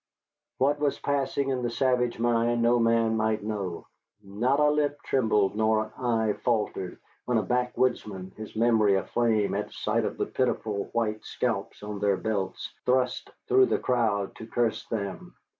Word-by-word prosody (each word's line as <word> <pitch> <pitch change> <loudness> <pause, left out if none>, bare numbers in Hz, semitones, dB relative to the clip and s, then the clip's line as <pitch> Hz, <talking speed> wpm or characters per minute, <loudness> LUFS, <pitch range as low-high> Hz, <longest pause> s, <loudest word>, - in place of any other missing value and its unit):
What 145 +2 +2
was 145 -1 +1
passing 140 -1 -1
in 130 -2 -1
the 120 - -1
savage 125 -1 +1
mind 120 0 +1
no 120 +1 +4
man 115 -1 +3
might 110 -1 0
know. 100 -5 -4 0.4
Not 120 +8 0
a 150 0 +5
lip 145 -1 0
trembled 105 -6 +2
nor 110 0 +2
an 110 - -11
eye 115 -4 +1
faltered 105 -6 -1 0.3
when 125 -1 +1
a 110 - +1
backwoodsman, 120 -5 -1
his 110 0 -9
memory 110 -3 +4
aflame 105 +2 +1
at - - -3
sight - - -1
of - - -3
the - - 0
pitiful 105 -2 -1
white 110 -2 -1
scalps 110 -5 -3
on 105 -1 -5
their 100 -1 +2
belts, 100 -4 -3
thrust 125 0 +1 0.2
through 390 -1 +5
the - - +1
crowd 110 -6 0
to 110 - -9
curse 115 -1 -1
them. 100 -4 -5
115 Hz, 160 wpm, -27 LUFS, 105-125 Hz, 0.4 s, a